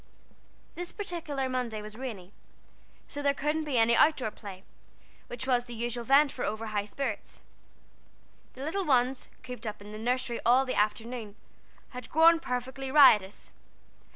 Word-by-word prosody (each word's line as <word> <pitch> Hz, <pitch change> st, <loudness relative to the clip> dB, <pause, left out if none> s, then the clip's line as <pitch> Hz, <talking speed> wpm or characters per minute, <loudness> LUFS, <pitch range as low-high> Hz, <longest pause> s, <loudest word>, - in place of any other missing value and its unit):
This 355 Hz, 0 st, -6 dB
particular 330 Hz, -9 st, -3 dB
Monday 250 Hz, -4 st, -2 dB
was 210 Hz, 0 st, -9 dB
rainy, 215 Hz, -7 st, -7 dB, 0.7 s
so 290 Hz, -, -6 dB
there 280 Hz, -1 st, +2 dB
couldn't 305 Hz, +2 st, -1 dB
be 280 Hz, -4 st, -1 dB
any 230 Hz, +1 st, +4 dB
out 310 Hz, +6 st, +5 dB
door 220 Hz, -5 st, -3 dB
play, 195 Hz, -4 st, -10 dB, 0.6 s
which 245 Hz, +1 st, -6 dB
was 245 Hz, -2 st, +1 dB
the 240 Hz, -1 st, -8 dB
usual 240 Hz, +1 st, -3 dB
vent 275 Hz, +4 st, +5 dB
for 250 Hz, -, -5 dB
over 220 Hz, +1 st, -3 dB
high 210 Hz, -2 st, -2 dB
spirits. 225 Hz, 0 st, -5 dB, 1.1 s
The 260 Hz, -, -8 dB
little 390 Hz, +6 st, -1 dB
ones, 260 Hz, -4 st, +1 dB
cooped 250 Hz, -2 st, -7 dB
up 210 Hz, 0 st, -5 dB
in 205 Hz, +1 st, -11 dB
the 215 Hz, -, -7 dB
nursery 245 Hz, +1 st, -1 dB
all 255 Hz, +3 st, +4 dB
the 255 Hz, -, -2 dB
afternoon, 215 Hz, +1 st, -2 dB, 0.5 s
had 250 Hz, -2 st, -9 dB
grown 330 Hz, +2 st, +6 dB
perfectly 260 Hz, -1 st, -4 dB
riotous. 225 Hz, -9 st, +5 dB
250 Hz, 155 wpm, -29 LUFS, 220-275 Hz, 1.1 s, grown